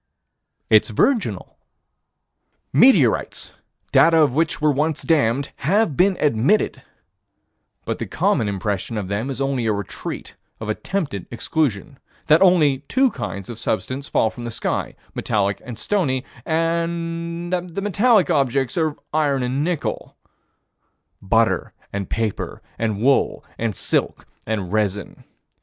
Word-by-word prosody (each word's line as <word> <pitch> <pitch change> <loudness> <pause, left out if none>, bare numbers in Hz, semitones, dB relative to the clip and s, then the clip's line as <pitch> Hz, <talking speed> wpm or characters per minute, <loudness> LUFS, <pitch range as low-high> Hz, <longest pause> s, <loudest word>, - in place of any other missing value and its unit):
It's 110 -1 +5
virginal. 225 - 0 1.1
Meteorites, 265 0 +4 0.4
data 165 0 +5
of 150 -5 +4
which 160 +3 0
were 150 0 +3
once 150 +2 -1
of - - -12
the 165 - +5
damned, 140 -1 +1
have 185 +1 +1
been 190 +3 +3
admitted, 145 - +2 1.0
but - - -3
the - - -4
common 140 - +1
impression 100 +3 -2
of 100 -3 -4
them 105 +6 -2
is 135 -2 -4
only 135 -4 0
a 110 - +2
retreat 100 -2 -6 0.2
of 110 - -5
attempted 140 - -3
exclusion: 120 - -2 0.3
that 155 +2 +5
only 160 -8 +5
two 265 -1 +3
kinds 105 - -5
of 115 -2 -8
substance 130 +5 -2
fall 110 - +2
from 120 - -10
the 120 - -4
sky: 115 - -2 0.2
metallic 100 -1 0
and 120 -4 -8
stony: 135 - 0 0.2
that 170 +2 -2
the 195 +4 -3
metallic 205 +1 +3
objects 135 +1 +1
are 160 - +3
of 150 - -7
iron 145 -4 +1
and 130 +3 -1
nickel 170 -3 -3 1.0
Butter 110 +3 +1 0.2
and 100 -1 -3
paper 110 -3 -3 0.2
and 110 -3 -1
wool 135 +5 +2
and 110 -3 -1
silk - - -1 0.2
and 100 -4 -2
resin. 105 -2 -2
140 Hz, 135 wpm, -21 LUFS, 110-165 Hz, 1.1 s, It's